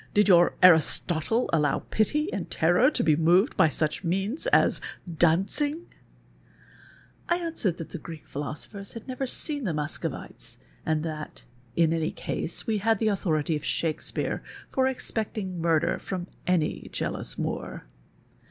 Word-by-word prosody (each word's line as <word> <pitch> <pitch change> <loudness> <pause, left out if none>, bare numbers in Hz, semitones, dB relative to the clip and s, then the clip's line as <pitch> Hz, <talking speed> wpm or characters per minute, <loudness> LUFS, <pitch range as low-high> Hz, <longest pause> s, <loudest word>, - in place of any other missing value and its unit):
Did 210 0 +4
your 175 -2 +6
Aristotle 175 +5 +4
allow 150 -3 +2
pity 300 +8 +1
and 190 -4 -4
terror 175 - +4
to - - -1
be 155 -3 +4
moved 175 - +3
by 160 - +5
such 155 +4 -2
means 195 - -1
as - - +3 0.3
dancing? 195 - +1 0.7
"' - - -27
I 345 - +3
answered 325 - -1
that 165 - -7
the 175 - -6
Greek 160 -2 -10
jjhilosopher 150 +8 -6
had 230 - -9
never 260 +1 -3
seen 290 +2 0
the 175 -8 -1
Muscovites 150 0 -5 0.3
and 155 -1 +1
that, 155 -2 -6 0.3
in 165 -1 +3
any 160 -1 0
case, 165 - -4
wc 220 -2 0
had 225 +2 +2
the 220 +1 +1
authority 160 -6 0
of 150 - -4
Shakespeare 160 -1 -1 0.3
for 260 0 +2
expecting 215 -8 -3
nuirder 165 -1 +2
from 185 -2 -4 0.2
any 175 -4 0
jealous - - -2
Moor. - - -4
180 Hz, 145 wpm, -27 LUFS, 160-225 Hz, 0.7 s, your